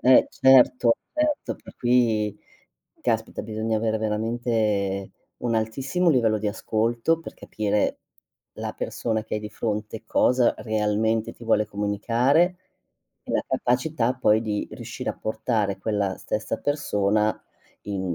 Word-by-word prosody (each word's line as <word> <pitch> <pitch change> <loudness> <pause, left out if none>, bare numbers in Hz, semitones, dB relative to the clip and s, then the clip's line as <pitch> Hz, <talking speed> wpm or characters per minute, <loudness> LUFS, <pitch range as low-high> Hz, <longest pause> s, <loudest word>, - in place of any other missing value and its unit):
Eh, 130 +1 +6
certo, 125 -2 +5 0.2
certo. 305 -1 0
Per - - -14
cui, 115 -4 +2 0.6
caspita, - - -1
bisogna 110 0 -2
avere 110 0 0
veramente 110 -3 -1 0.3
un 120 -1 -1
altissimo 135 +10 +1
livello 115 -6 +3
di 105 - -3
ascolto 115 +8 0
per - - -9
capire 105 -1 -1 0.5
la - - -4
persona 110 -2 -2
che 110 - -4
hai 105 - -1
di 105 - -6
fronte 105 0 -4
cosa 125 -1 +3
realmente 110 0 0
ti 120 - -13
vuole 110 -2 +3
comunicare, 115 - +1 0.7
e - - -6
la - - +1
capacità 125 0 +1
poi 110 -3 +3
di 105 -2 -2
riuscire - - -6
a - - -9
portare 110 -2 -1
quella 100 -2 -1
stessa 110 +1 -3
persona 110 -7 0 0.4
in 95 -3 -3
110 Hz, 130 wpm, -25 LUFS, 105-120 Hz, 0.7 s, Eh